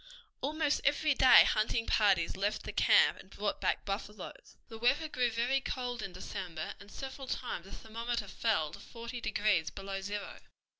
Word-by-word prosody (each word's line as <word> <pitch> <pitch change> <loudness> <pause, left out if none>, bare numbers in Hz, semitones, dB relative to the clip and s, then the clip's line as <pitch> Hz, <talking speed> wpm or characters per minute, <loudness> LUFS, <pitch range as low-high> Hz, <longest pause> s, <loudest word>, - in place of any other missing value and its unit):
Almost 300 +1 0
every 290 +1 +3
day 260 -1 +8
hunting 225 +2 +1
parties 195 -6 +3
left 200 +2 -1
the - - -5
camp 480 -1 +5
and 190 - -14
brought 205 +1 -3
back - - 0
buffaloes. 200 0 -6
The 225 -1 -10
weather 270 +7 +2
grew 250 -5 +1
very 240 +4 +1
cold 245 -3 -3
in 195 - -5
December, 180 -3 -6
and 200 +1 -14
several 270 0 -7
times 240 -9 -4
the 195 - -13
thermometer 230 +3 -4
fell 180 -10 0
to - - -10
forty 235 +1 -8
degrees 205 -7 +1
below 195 0 -6
zero. 205 +1 -5
225 Hz, 165 wpm, -32 LUFS, 195-255 Hz, -, day